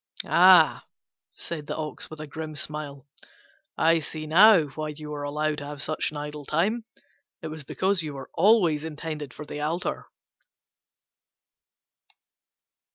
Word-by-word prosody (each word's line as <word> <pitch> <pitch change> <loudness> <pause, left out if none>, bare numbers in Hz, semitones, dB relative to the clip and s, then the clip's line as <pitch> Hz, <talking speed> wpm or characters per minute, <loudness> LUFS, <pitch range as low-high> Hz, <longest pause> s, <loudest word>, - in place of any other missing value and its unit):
"Ah," 180 -3 +6 0.5
said 155 -3 -7
the - - -4
Ox, 155 -1 -5
with 155 - -10
a 155 - -5
grim 155 +1 -7
smile, 145 -2 -5 0.7
"I 165 +1 +4
see 155 0 -5
now 175 0 +6
why 155 +2 -5
you 150 0 -7
were 145 -1 -5
allowed 150 +1 -2
to 145 - -7
have 145 0 -7
such 155 +2 -1
an 150 - -8
idle 150 0 -6
time: 200 - 0 0.6
it 160 - -4
was 155 -1 -8
because 190 +6 0
you 150 -3 -5
were 135 -1 -9
always 175 -5 +3
intended 155 -2 -6
for 150 - -9
the 150 - -6
altar." 165 +4 -3
155 Hz, 145 wpm, -26 LUFS, 150-165 Hz, 0.7 s, Ah